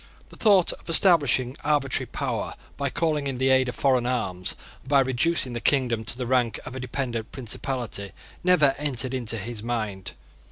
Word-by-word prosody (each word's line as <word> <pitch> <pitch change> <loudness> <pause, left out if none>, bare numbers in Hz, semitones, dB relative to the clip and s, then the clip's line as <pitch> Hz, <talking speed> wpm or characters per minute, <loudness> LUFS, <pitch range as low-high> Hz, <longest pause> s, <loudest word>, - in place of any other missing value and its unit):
The - - -14
thought 200 -5 +4
of - - -13
establishing 145 -7 +4
arbitrary 145 -3 0
power, - - -3 0.2
by 140 0 -2
calling 150 -1 0
in 135 -2 -3
the 130 +1 +1
aid 130 -1 +3
of 125 - -5
foreign 130 -3 +2
arms, 90 -8 -2 0.2
and 130 - -15
by 140 -1 +5
reducing 130 +1 0
the 120 - -4
kingdom 120 -4 +2
to 105 - -2
the 125 - -3
rank 125 -2 +1
of 130 - -7
a - - -5
dependent 120 -3 -4
principality, 120 -5 -4 0.3
never 175 -7 +4
entered 135 -3 -1
into 115 -3 -2
his 110 +1 -5
mind. 110 -5 -4
130 Hz, 175 wpm, -25 LUFS, 120-140 Hz, 0.3 s, by